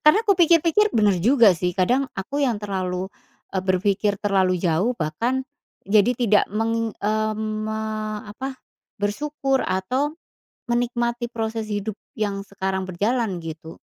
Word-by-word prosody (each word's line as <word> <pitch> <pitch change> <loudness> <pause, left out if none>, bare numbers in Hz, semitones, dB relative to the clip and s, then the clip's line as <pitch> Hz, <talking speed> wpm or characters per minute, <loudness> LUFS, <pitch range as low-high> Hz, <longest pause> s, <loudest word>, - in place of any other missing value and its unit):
Karena 305 +8 +7
ku 400 - +6
pikir-pikir 340 +4 +4
bener 210 -4 +3
juga 230 -4 +6
sih, 180 +1 -1
kadang 250 +9 +2
aku 280 +10 -3
yang 240 -5 +1
terlalu, 185 -2 -2 0.5
eee, 185 - 0
berpikir 200 +2 +1
terlalu 190 -3 +2
jauh 180 +7 +2
bahkan, 230 +13 -1 0.4
jadi 210 +3 +4
tidak 220 -4 +3
meng 225 +1 0
eee, 215 +1 +1
me 215 0 -3 0.5
apa, 260 +5 -6 0.4
bersyukur 270 +5 0
atau 250 +11 0 0.6
menikmati 240 0 0
proses 225 -1 -3
hidup 205 0 -3 0.2
yang 200 -2 -2
sekarang 190 -1 -3
berjalan, 205 0 0
gitu. 160 0 -8
215 Hz, 130 wpm, -23 LUFS, 190-245 Hz, 0.6 s, Karena